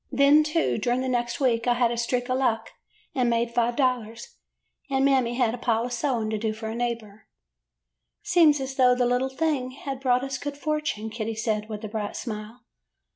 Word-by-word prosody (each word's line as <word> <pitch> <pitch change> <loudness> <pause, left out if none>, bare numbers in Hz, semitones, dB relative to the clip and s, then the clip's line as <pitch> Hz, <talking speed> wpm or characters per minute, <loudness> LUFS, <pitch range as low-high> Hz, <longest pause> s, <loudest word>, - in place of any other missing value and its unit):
Then, 280 +3 +5
too, 310 -4 0
during 245 +3 0
the 260 - -2
next 240 -2 -1
week 240 -4 +1
I 240 - +4
had 240 -1 +2
a - - -1
streak 245 +1 -1
of 255 0 0
luck, 225 -4 0 0.4
and 250 -3 +1
made 235 0 0
five 240 0 +1
dollars, 235 -4 -1 0.5
and 270 0 +2
Mammy 260 -4 +2
had 240 -3 +1
a 245 - -5
pile 230 -1 +1
of 245 - -4
sewing 235 -4 -1
to 215 - -1
do 220 0 -1
for 220 0 -6
a - - -4
neighbor. 230 -3 -4 0.5
'' - - -58
'Seems 320 -5 +4
as 265 0 -5
though 250 -1 +5
the 250 0 +1
little 250 +2 +1
thing 265 -2 -1
had 270 0 -6
brought 250 -1 +2
us 270 -1 -4
good 290 0 -5
fortune,' 300 -8 -2
Kitty 225 0 -4
said, 215 -1 -2
with 215 0 -6
a - - -3
bright 210 -1 -4
smile. 220 +1 -6
245 Hz, 210 wpm, -25 LUFS, 225-265 Hz, 0.5 s, Then